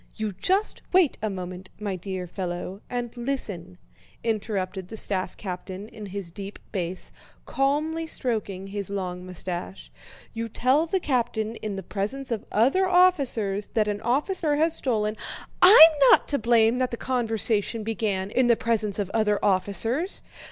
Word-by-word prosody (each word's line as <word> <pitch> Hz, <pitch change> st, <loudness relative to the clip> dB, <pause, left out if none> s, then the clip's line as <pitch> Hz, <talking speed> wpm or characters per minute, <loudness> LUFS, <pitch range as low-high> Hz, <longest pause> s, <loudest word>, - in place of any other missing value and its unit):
"You 215 Hz, -1 st, -2 dB
just 380 Hz, -, 0 dB
wait 365 Hz, -6 st, +3 dB
a 215 Hz, -, -1 dB
moment, 185 Hz, -1 st, -7 dB
my 205 Hz, -3 st, -3 dB
dear 185 Hz, 0 st, -5 dB
fellow, 180 Hz, +2 st, -5 dB
and 245 Hz, -1 st, -4 dB
listen," 210 Hz, -9 st, -3 dB, 0.5 s
interrupted 200 Hz, -4 st, -2 dB
the 220 Hz, -, -6 dB
staff 185 Hz, -3 st, -2 dB
captain 185 Hz, +1 st, -6 dB
in 215 Hz, -3 st, -9 dB
his 195 Hz, -3 st, -6 dB
deep 200 Hz, +2 st, -8 dB
bass, 180 Hz, -2 st, -4 dB, 0.3 s
calmly 305 Hz, +4 st, 0 dB
stroking 215 Hz, -10 st, -3 dB
his 200 Hz, 0 st, -4 dB
long 180 Hz, -2 st, -4 dB
mustache. 180 Hz, +1 st, -6 dB, 0.4 s
"You 230 Hz, 0 st, -4 dB
tell 265 Hz, +9 st, +2 dB
the 380 Hz, +3 st, 0 dB
colonel 235 Hz, -7 st, -1 dB
in 210 Hz, -2 st, -3 dB
the 195 Hz, -, -5 dB
presence 215 Hz, +9 st, -3 dB
of 225 Hz, -, -2 dB
other 275 Hz, -, +3 dB
officers 275 Hz, -, +3 dB
that 215 Hz, -2 st, +2 dB
an 205 Hz, 0 st, -2 dB
officer 295 Hz, -, +1 dB
has 320 Hz, +2 st, +1 dB
stolen..." 215 Hz, -4 st, -1 dB, 0.4 s
"I'm 350 Hz, -3 st, +10 dB, 0.2 s
not -, -, +6 dB
to 285 Hz, -, 0 dB
blame 230 Hz, +1 st, +3 dB
that 255 Hz, -1 st, +1 dB
the 235 Hz, -, -5 dB
conversation 225 Hz, -3 st, 0 dB
began 210 Hz, -3 st, -2 dB
in 255 Hz, +1 st, +3 dB
the 235 Hz, -, +5 dB
presence 220 Hz, -3 st, 0 dB
of 200 Hz, -2 st, -2 dB
other 215 Hz, -2 st, +2 dB
officers. 215 Hz, -, +1 dB
215 Hz, 150 wpm, -25 LUFS, 195-255 Hz, 0.5 s, I'm